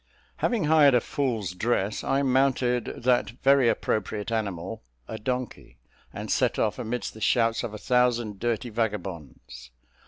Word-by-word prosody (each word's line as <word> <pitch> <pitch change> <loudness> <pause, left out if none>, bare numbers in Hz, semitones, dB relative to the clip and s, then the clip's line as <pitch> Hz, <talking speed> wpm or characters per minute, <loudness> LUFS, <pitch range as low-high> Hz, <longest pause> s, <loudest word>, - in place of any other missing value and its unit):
Having 235 -7 0
hired 150 -3 +5
a - - +5
fool's 115 -8 -2
dress, 105 +1 -1
I 140 +1 +1
mounted 130 -2 +2 0.2
that 125 0 +2
very 135 -3 +5
appropriate 110 -1 -2
animal 100 -2 -3 0.3
a 110 - -6
donkey, 125 - -4 0.3
and - - -6
set - - +1
off - - 0
amidst 120 +2 -3
the 110 - -12
shouts 115 0 +2
of 115 - -4
a 105 - -7
thousand 120 -3 +1
dirty 120 +1 -2
vagabonds. 95 - -5
115 Hz, 145 wpm, -26 LUFS, 105-125 Hz, 0.3 s, hired